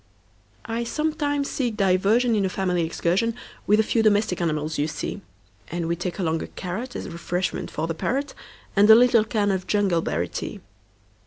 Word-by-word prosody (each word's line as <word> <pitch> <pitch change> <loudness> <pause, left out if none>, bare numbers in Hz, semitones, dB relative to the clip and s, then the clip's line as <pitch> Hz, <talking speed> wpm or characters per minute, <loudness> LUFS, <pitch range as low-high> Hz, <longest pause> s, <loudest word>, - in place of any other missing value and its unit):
I 230 0 -2
sometimes 290 +1 -1
seek 240 -5 -2
diversionIn 205 +3 +3
a 190 - +1
family 180 -3 0
excursionWith 195 +8 0 0.4
the 220 - +4
few 225 +1 +1
domestic 210 -4 +2
animals 155 -2 -1
you 145 - +1
see; 160 - -5 0.5
And 170 0 -3
we 170 - 0
take 175 +1 -4
along 165 -4 0
a - - -5
carrotAs 215 +8 -5
refreshment 175 +2 -2
for 155 - -3
the 165 - -2
parrot, 275 - -2 0.4
And 205 +1 +5
a 220 - +11
little 240 -1 +5
can 215 -2 0
of 190 -1 -2
jungleberry 170 - +1
tea. - - -5
200 Hz, 160 wpm, -24 LUFS, 170-230 Hz, 0.5 s, a